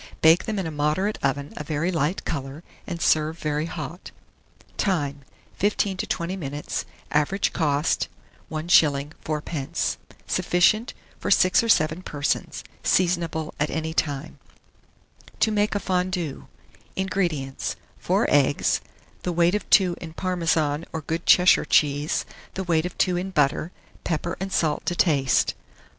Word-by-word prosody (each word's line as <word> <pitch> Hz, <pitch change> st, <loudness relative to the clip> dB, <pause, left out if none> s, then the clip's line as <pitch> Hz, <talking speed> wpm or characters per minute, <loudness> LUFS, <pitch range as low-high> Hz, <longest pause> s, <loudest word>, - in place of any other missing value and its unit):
Bake 160 Hz, +2 st, +6 dB
them 215 Hz, -1 st, -2 dB
in 190 Hz, -, -1 dB
a 160 Hz, -, -3 dB
moderate 155 Hz, +8 st, 0 dB
oven 140 Hz, +1 st, -1 dB
a -, -, -4 dB
very 155 Hz, +4 st, -1 dB
light 165 Hz, +2 st, -1 dB
colour, 140 Hz, +1 st, -4 dB, 0.2 s
and 175 Hz, -3 st, -4 dB
serve 155 Hz, 0 st, +2 dB
very 150 Hz, 0 st, -1 dB
hot. 160 Hz, +1 st, -7 dB, 0.7 s
Time. 145 Hz, -8 st, -1 dB, 0.4 s
15 205 Hz, -1 st, +1 dB
to -, -, -3 dB
20 170 Hz, +2 st, -2 dB
minutes. 145 Hz, -5 st, -4 dB, 0.3 s
Average 150 Hz, +7 st, +1 dB
cost, 150 Hz, -2 st, +1 dB, 0.4 s
1s. 155 Hz, -3 st, +3 dB
4d. 150 Hz, -2 st, -2 dB, 0.3 s
Sufficient 215 Hz, +7 st, +2 dB, 0.2 s
for -, -, -3 dB
6 185 Hz, +7 st, +5 dB
or 230 Hz, -, -3 dB
7 155 Hz, -2 st, +3 dB
persons. 145 Hz, -5 st, -2 dB, 0.2 s
Seasonable 170 Hz, -3 st, +1 dB
at 150 Hz, -, +1 dB
any 160 Hz, 0 st, -3 dB
time. 145 Hz, -1 st, -2 dB, 1.0 s
TO 220 Hz, -, +3 dB
MAKE 210 Hz, 0 st, +1 dB
A -, -, +1 dB
FONDUE. 180 Hz, -5 st, -2 dB, 0.5 s
1643. -, -, -1 dB
INGREDIENTS. 165 Hz, -9 st, -2 dB, 0.2 s
4 -, -, +1 dB
eggs, 145 Hz, 0 st, +3 dB, 0.4 s
the 180 Hz, -, -2 dB
weight 170 Hz, +1 st, +3 dB
of 210 Hz, -, -2 dB
2 185 Hz, -3 st, +5 dB
in 160 Hz, -2 st, -7 dB
Parmesan 165 Hz, -4 st, 0 dB
or 160 Hz, -, -4 dB
good 165 Hz, +3 st, -4 dB
Cheshire 180 Hz, 0 st, +6 dB
cheese, 145 Hz, 0 st, +2 dB, 0.3 s
the 190 Hz, -, -2 dB
weight 170 Hz, -1 st, +1 dB
of 180 Hz, -, -11 dB
2 180 Hz, -2 st, +2 dB
in 185 Hz, +2 st, -3 dB
butter; 150 Hz, 0 st, +1 dB, 0.3 s
pepper 170 Hz, 0 st, -2 dB
and 190 Hz, +1 st, -4 dB
salt 155 Hz, -5 st, +1 dB
to 175 Hz, -, 0 dB
taste. 140 Hz, -8 st, +2 dB
160 Hz, 145 wpm, -24 LUFS, 150-180 Hz, 1.0 s, Bake